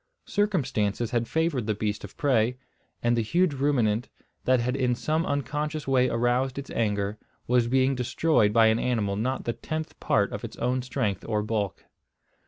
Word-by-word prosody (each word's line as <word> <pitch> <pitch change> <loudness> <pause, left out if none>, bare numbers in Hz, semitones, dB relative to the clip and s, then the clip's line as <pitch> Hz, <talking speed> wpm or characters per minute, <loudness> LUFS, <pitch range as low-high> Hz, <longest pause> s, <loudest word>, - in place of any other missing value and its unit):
Circumstances 125 - 0
had 120 -2 0
favoured 160 -8 0
the 110 - +1
beast 105 0 -2
of 100 - -10
prey; 125 -3 +2 0.5
and 120 0 +3
the 115 - +2
huge 170 +8 +2
ruminant, 125 -5 +1 0.4
that 130 -1 +4
had 125 +2 -1
in 125 -2 +1
some 155 +7 -1
unconscious 150 +1 -2
way 130 -1 +3
aroused 120 +3 +1
its 140 - -6
anger, 105 -2 -1 0.3
was 120 -1 +2
being 130 +2 +3
destroyed 125 -2 +2
by 115 +1 +5
an 110 +1 +3
animal 110 -6 0
not 125 +6 -1
the 120 - 0
tenth 155 +4 -5
part - - +1
of - - -5
its - - -7
own 125 +2 0
strength 120 -6 -2
or 105 -2 0
bulk. 105 -3 -2
125 Hz, 175 wpm, -27 LUFS, 110-140 Hz, 0.5 s, by